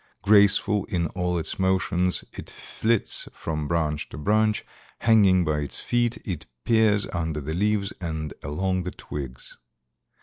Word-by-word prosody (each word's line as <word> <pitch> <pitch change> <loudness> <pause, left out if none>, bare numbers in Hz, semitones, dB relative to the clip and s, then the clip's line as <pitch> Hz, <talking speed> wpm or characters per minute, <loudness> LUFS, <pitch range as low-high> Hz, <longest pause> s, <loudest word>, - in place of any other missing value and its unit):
Graceful 100 0 +4
in 85 -2 -1
all 90 0 -1
its 80 - -2
motions, 95 -1 +1
it - - -8
flits 115 -1 -1
from 75 -2 -4
branch 75 -2 -1
to - - -9
branch; 105 +6 +1 0.3
hanging 100 -6 +4
by 75 -1 0
its 70 -2 -4
feet, 120 -1 0
it 90 -7 -5 0.2
peers 110 -3 +3
under 80 -3 -2
the 75 +2 -4
leaves 100 +2 0
and 80 -3 -4
along 95 +6 -1
the 90 - -4
twigs. 65 -8 -8
90 Hz, 140 wpm, -25 LUFS, 80-105 Hz, 0.3 s, Graceful